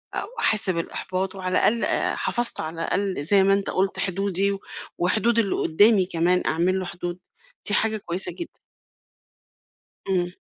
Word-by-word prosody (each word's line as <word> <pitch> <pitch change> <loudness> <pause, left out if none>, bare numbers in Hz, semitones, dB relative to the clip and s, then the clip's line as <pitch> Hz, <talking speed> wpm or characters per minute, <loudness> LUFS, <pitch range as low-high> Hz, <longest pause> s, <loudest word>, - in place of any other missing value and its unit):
أو - - -3
أحس 215 -2 +4
بالإحباط 185 +2 -3
وعلى 185 -1 -2
الأقل 230 +1 +2
آآ، - - 0
حفَظت 240 -1 +1
على 160 +1 -4
الأقل 190 -6 -2
زي 195 +4 +5
ما 195 +1 +3
أنت 200 0 -1
قُلت 190 +1 -1
حدودي 195 +1 0
و 195 - -4 0.4
وحدود 220 +6 +1
اللي 200 -4 0
قُدّامي 205 +3 +3
كمان، 180 +1 +1
أعمل 180 +4 +1
له 185 - -4
حدود، 175 0 -6 0.5
دي 205 - +2
حاجة 220 0 +2
كويسة 185 -1 -2
جدًا. 345 - -9 1.5
إمم. 180 -2 -1
190 Hz, 155 wpm, -23 LUFS, 180-205 Hz, 1.5 s, زي